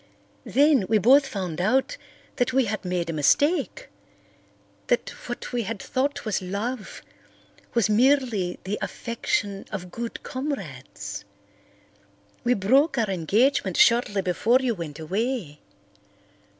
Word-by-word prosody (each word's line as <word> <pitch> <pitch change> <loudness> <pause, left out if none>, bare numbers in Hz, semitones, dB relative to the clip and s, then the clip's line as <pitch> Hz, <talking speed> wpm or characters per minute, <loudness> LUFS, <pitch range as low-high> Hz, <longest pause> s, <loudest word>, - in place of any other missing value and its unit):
Then 280 -7 +4
we 220 - +4
both 270 +7 +5
found 180 -8 -4
out 265 - +1 0.4
that 245 -1 +1
we 265 -1 +3
had 215 -1 -3
made 180 -2 -2
a - - -5
mistake—that 290 - +1 1.4
what - - -6
we 245 - +1
had 220 -1 -4
thought 270 +5 -2
was 215 -3 -1
love 205 +4 -5 0.7
was 235 -3 +3
merely 230 -5 +2
the 200 +3 -3
affection 205 -4 -3
of 180 -3 -6
good 235 +3 -6
comrades. 255 - -5 1.2
We 245 +1 +3
broke 265 - +3
our 220 -4 +1
engagement 195 - +1
shortly 225 -5 +4
before 205 +7 +3
you 255 -3 0
went 165 -7 -7
away. 190 - -3
220 Hz, 120 wpm, -25 LUFS, 185-260 Hz, 1.4 s, both